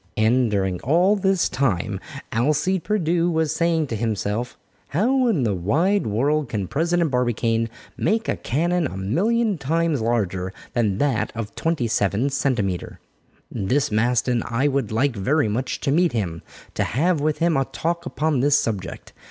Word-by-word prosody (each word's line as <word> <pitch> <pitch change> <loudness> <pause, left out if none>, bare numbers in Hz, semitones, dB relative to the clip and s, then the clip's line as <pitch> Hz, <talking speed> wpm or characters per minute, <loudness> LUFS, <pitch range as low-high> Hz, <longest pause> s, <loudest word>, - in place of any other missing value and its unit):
And 115 +3 +3
during 95 -3 -1
all 175 - +3
this 190 -2 +2
time 105 -6 -1 0.3
Alcide 150 +9 +1
Pierdeux 175 -4 +1
was 160 -2 0
saying 165 -2 +1
to 120 - -4
himself, 110 +2 -2 0.3
"How 250 - +2
in 185 - +2
the 110 -4 +1
wide 160 - +1
world 140 +6 0
can 100 -4 -2
President 170 - 0
Barbicane 115 -2 0 0.3
make 220 +6 0
a - - +1
cannon 170 +4 0
a 95 - -7
million 200 - +1
times 160 0 0
larger 95 -5 -1 0.2
than 105 -5 +1
that 135 -2 0
of 115 -2 -5
twenty 160 -7 -1
seven 110 +4 +1
centimetre? 120 -10 -1 0.5
This 125 +9 0
Maston, 120 +2 +1
I 125 +4 +1
would 140 -3 -1
like 120 +3 +1
very 130 +7 +1
much 115 +5 -2
to 140 - 0
meet 170 +3 +3
him 85 -8 -2 0.3
to - - 0
have 155 +6 +1
with 155 0 0
him 170 -1 +2
a 135 - +2
talk 170 +4 -3
upon 150 -2 0
this 145 +2 +4
subject. 100 -5 -4
135 Hz, 160 wpm, -23 LUFS, 110-165 Hz, 0.5 s, this